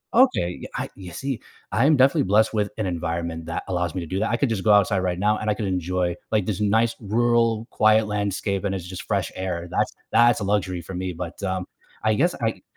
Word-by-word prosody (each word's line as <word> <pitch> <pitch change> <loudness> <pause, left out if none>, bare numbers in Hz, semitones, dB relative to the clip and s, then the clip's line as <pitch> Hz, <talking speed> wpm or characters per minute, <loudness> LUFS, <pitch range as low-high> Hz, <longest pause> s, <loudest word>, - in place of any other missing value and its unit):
Okay, 235 - +3
yeah, - - -6
I - - -3
you 95 -2 -9
see, 135 +4 -4 0.3
I 115 - +2
am 155 - +5
definitely 135 +4 +4
blessed 110 +4 +3
with 105 -2 0
an 110 - -1
environment 85 -2 -3
that 85 - -3
allows 90 -3 -1
me 95 - -1
to 85 - -6
do 95 +4 -2
that- 110 - 0
I 120 - +1
could 140 - +1
just 110 -5 -2
go 110 - +4
outside 100 -1 +4
right 90 -1 -1
now, 105 +2 +2
and 110 - -2
I - - +3
could 105 - -3
enjoy, 90 -1 -1 0.2
like, 105 -3 +2
this 105 0 -2
nice, 110 +3 +2
rural, 115 +1 +2
quiet 110 0 +4
landscape, 100 -1 -1
and 100 -1 -1
it's 90 -3 -5
just 90 0 -7
fresh - - -1
air- 90 -2 -3
that's - - +1 0.2
that's 120 0 +5
a - - -3
luxury 95 -3 0
for 85 - -9
me, 90 +1 -3
but, 85 +2 -7
um, 95 -1 -1 0.4
I 110 0 +3
guess 170 +11 +2
I 110 -5 -1
100 Hz, 240 wpm, -24 LUFS, 90-110 Hz, 0.4 s, am